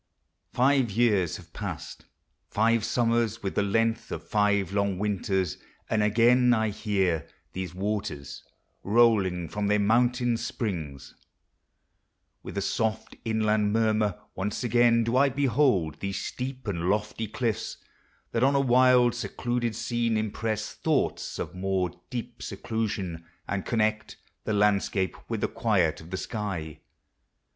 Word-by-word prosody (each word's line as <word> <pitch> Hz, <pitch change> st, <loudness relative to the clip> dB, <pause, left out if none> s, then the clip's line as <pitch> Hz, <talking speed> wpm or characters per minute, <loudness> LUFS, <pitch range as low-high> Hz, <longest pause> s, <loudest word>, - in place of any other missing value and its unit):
Five 130 Hz, -1 st, +3 dB
years 105 Hz, -5 st, +2 dB
have -, -, -16 dB
past; -, -, -6 dB, 0.4 s
five 115 Hz, +1 st, +2 dB
summers, 115 Hz, -1 st, +1 dB
with 95 Hz, -, -2 dB
the -, -, +1 dB
length 115 Hz, +3 st, 0 dB
Of -, -, -6 dB
five 100 Hz, -3 st, +1 dB
long 100 Hz, -2 st, +1 dB
winters! 95 Hz, -3 st, -1 dB, 0.3 s
and 110 Hz, -, +2 dB
again 120 Hz, +4 st, +4 dB
1 110 Hz, -3 st, +3 dB
hear 95 Hz, -7 st, 0 dB, 0.3 s
These 90 Hz, -2 st, -5 dB
waters,* 95 Hz, -8 st, -4 dB, 0.4 s
rolling 100 Hz, -6 st, +3 dB
from 105 Hz, +5 st, -2 dB
their 105 Hz, +1 st, +3 dB
mountain 120 Hz, +3 st, +2 dB
springs 80 Hz, -, -4 dB, 1.3 s
With -, -, -8 dB
a 100 Hz, -, 0 dB
soft 110 Hz, +1 st, -1 dB
inland 110 Hz, -2 st, +1 dB
murmur.— 110 Hz, -3 st, +1 dB
Once 100 Hz, +6 st, -3 dB
again 120 Hz, 0 st, +4 dB
Do 115 Hz, -, -1 dB
1 135 Hz, +1 st, +3 dB
behold 125 Hz, -, +2 dB
these 100 Hz, -1 st, -3 dB
sloop 130 Hz, +1 st, -5 dB
and 90 Hz, -3 st, -1 dB
lofty 105 Hz, +2 st, -1 dB
cliffs. 110 Hz, 0 st, -2 dB, 0.5 s
That 115 Hz, -, +1 dB
on 135 Hz, +1 st, +4 dB
a -, -, +4 dB
wild, 125 Hz, -2 st, +5 dB
secluded 120 Hz, 0 st, -2 dB
scene 120 Hz, -2 st, 0 dB
impress 110 Hz, 0 st, -2 dB
Thoughts -, -, -1 dB
of -, -, -4 dB
more 95 Hz, -1 st, -1 dB, 0.2 s
deep 120 Hz, -1 st, -6 dB
seclusion, 100 Hz, -5 st, -3 dB, 0.2 s
and 100 Hz, -2 st, -3 dB
conned 110 Hz, -2 st, 0 dB, 0.3 s
The 110 Hz, -, 0 dB
landscape 100 Hz, -2 st, +1 dB
with 115 Hz, -3 st, -2 dB
the -, -, +2 dB
quid 90 Hz, -10 st, +1 dB
of 80 Hz, -, -12 dB
the 95 Hz, -, -3 dB
sky. 95 Hz, -8 st, -4 dB
110 Hz, 135 wpm, -27 LUFS, 95-120 Hz, 1.3 s, wild